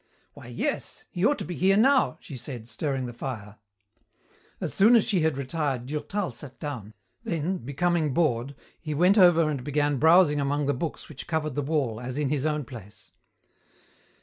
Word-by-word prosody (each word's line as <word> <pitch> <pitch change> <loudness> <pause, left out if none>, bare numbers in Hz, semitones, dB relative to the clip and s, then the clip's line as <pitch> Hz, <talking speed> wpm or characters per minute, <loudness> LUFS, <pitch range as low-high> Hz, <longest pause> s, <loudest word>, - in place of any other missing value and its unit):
"Why, - - -12
yes. - - -4
He 175 - -3
ought 290 - +1
to - - -5
be 180 - -5
here 195 +3 +3
now," 260 - +4
she 140 - -9
said, 120 -2 -7
stirring 135 0 -2
the 120 - -6
fire. 110 -5 -6 1.0
As - - -4
soon 220 +5 +6
as 225 - +5
she 195 -4 +1
had 160 -4 +1
retired 140 -2 -2
Durtal 155 +5 -3
sat 130 +3 -11
down, 115 -9 -6 0.3
then, 180 -3 -2
becoming 155 +3 0
bored, 135 -3 0 0.2
he 155 -2 -4
went 180 +7 +4
over 170 -3 +6
and 140 -4 -2
began 145 0 0
browsing 160 0 +5
among 145 +1 0
the 145 - +1
books 155 +5 -5
which 145 -4 -9
covered 155 -3 -1
the 145 - -1
wall 135 -7 -1
as 125 +2 -5
in 145 -2 0
his 145 +1 0
own 150 -2 -1
place. 110 -6 -12
150 Hz, 180 wpm, -26 LUFS, 130-170 Hz, 1.0 s, soon